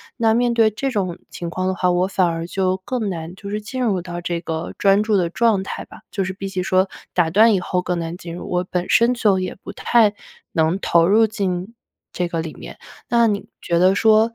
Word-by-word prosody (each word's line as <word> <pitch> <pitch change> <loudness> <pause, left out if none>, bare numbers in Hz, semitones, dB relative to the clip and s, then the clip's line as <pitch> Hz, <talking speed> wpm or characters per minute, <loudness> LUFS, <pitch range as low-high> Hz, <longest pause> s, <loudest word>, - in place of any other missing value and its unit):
那 225 -2 +2
面 240 +1 +2
对 225 -2 +4
这 270 +6 -2
种 190 -8 -2
情 170 -1 -6
况 185 +2 -2
的 190 - 0
话， 180 0 +1
我 180 +1 +2
反 190 -1 +1
而 165 0 -3
就 185 0 0
更 240 -5 -2
难 170 -1 -6
就 200 +1 -9
是 210 - -2
进 255 +5 -4
入 200 -6 +1
到 175 0 -6
这 170 0 -2
个 165 0 -4
专 200 +1 +4
注 215 -1 +2
的 175 -3 +1
状 215 0 +2
态 - - -5
吧。 - - -14
就 195 - -1
是 190 - -3
比 195 +1 -6
起 190 -1 -3
说 185 0 +3
被 - - -25 0.2
打 175 -3 +2
断 215 +6 +5
以 195 - +2
后 180 0 -1
更 180 -1 -2
难 165 0 -4
进 170 -1 -8
入， 175 - -7
我 180 0 0
本 180 -1 -2
身 235 +2 +4
就 210 -6 +2
也 185 -1 -4
不 - - -8
太 240 - -1 0.6
能 160 +3 +2
投 170 -3 +3
入 220 +4 +5
进 195 -1 -3 0.4
这 180 - -1
个 165 - -2
里 160 -1 -6
面。 - - -10 0.3
那 235 -1 +4
你 205 -1 -2
觉 170 -1 0
得 185 +2 +4
说， 220 +2 +4
190 Hz, 260 characters per minute, -21 LUFS, 175-215 Hz, 0.6 s, 断